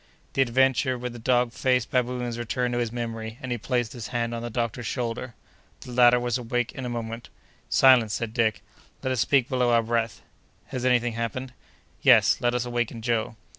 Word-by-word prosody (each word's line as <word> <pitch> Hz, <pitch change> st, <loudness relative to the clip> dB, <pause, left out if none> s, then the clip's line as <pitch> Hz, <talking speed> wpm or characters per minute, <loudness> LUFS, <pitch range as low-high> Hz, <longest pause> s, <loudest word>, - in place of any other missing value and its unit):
The 135 Hz, -, +2 dB
adventure 130 Hz, +1 st, +2 dB
with 125 Hz, 0 st, -5 dB
the 120 Hz, -, -9 dB
dog 120 Hz, 0 st, +2 dB
faced 125 Hz, -3 st, +1 dB
baboons 125 Hz, -1 st, -1 dB
returned 125 Hz, +1 st, -1 dB
to 120 Hz, -, 0 dB
his 120 Hz, -2 st, -1 dB
memory, 115 Hz, -2 st, -5 dB
and 130 Hz, -, -6 dB
he 120 Hz, -, -2 dB
placed 120 Hz, 0 st, -1 dB
his 120 Hz, -4 st, -6 dB
hand 120 Hz, -1 st, -2 dB
on 115 Hz, -, -4 dB
the 120 Hz, -, -4 dB
doctor's 115 Hz, 0 st, -3 dB
shoulder. 120 Hz, -1 st, -3 dB, 0.5 s
The 125 Hz, -, -9 dB
latter 125 Hz, 0 st, +5 dB
was 120 Hz, 0 st, -1 dB
awake 120 Hz, 0 st, -2 dB
in 130 Hz, -, -7 dB
a -, -, -3 dB
moment. 115 Hz, 0 st, -5 dB, 0.4 s
"Silence!" 125 Hz, -5 st, +5 dB
said 115 Hz, -2 st, -4 dB
Dick. 110 Hz, -7 st, 0 dB, 0.4 s
"Let 130 Hz, -, -1 dB
us 130 Hz, -, -1 dB
speak 130 Hz, +1 st, +3 dB
below 125 Hz, -3 st, +1 dB
our 115 Hz, -1 st, +4 dB
breath." 115 Hz, -1 st, -2 dB, 0.5 s
"Has 125 Hz, -1 st, -4 dB
any 125 Hz, -1 st, +5 dB
thing 120 Hz, -1 st, -3 dB
happened?" 120 Hz, +3 st, -4 dB, 0.5 s
"Yes, -, -, +6 dB
let 120 Hz, 0 st, +1 dB
us 125 Hz, 0 st, -1 dB
waken 120 Hz, -2 st, -3 dB
Joe." 115 Hz, -1 st, -1 dB
120 Hz, 200 wpm, -26 LUFS, 115-125 Hz, 0.5 s, Yes